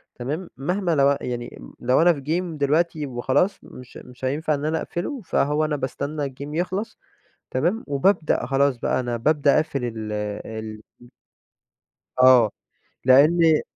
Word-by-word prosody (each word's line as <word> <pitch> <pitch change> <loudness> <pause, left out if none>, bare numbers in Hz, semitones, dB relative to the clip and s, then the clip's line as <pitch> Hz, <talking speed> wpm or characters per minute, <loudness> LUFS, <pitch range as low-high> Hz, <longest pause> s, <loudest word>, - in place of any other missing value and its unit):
تمام، 150 +9 -5
مهما 175 +4 -1
لو 140 0 +4
أن 140 - -3
يعني 120 - -6 0.2
لو 125 +4 +2
أنا 175 +1 +5
في 145 - -7
Game 165 +2 -2
دلوقتي 150 +2 +1
وخلاص، 130 +9 0
مش 125 -1 -12
مش 125 +1 -9
هينفع 150 +4 0
إن 145 0 -3
أنا 160 +1 0
أقفله، 230 - -4
فهو 150 -3 0
أنا 150 -1 -1
باستنى 140 +2 -3
الGame 140 +3 -8
يخلص 190 +5 -3 0.5
تمام، 175 - 0
وبابدأ 150 0 +1
خلاص، 135 0 +2
بقى 130 - 0
أنا 120 -1 -2
بابدأ 145 +4 +2
أقفل 150 -5 -1
ال 110 -2 -5 0.3
ال 110 -1 -7 1.4
آه، 125 -4 +7 0.6
لأن 155 +4 +5
145 Hz, 145 wpm, -23 LUFS, 130-160 Hz, 1.4 s, آه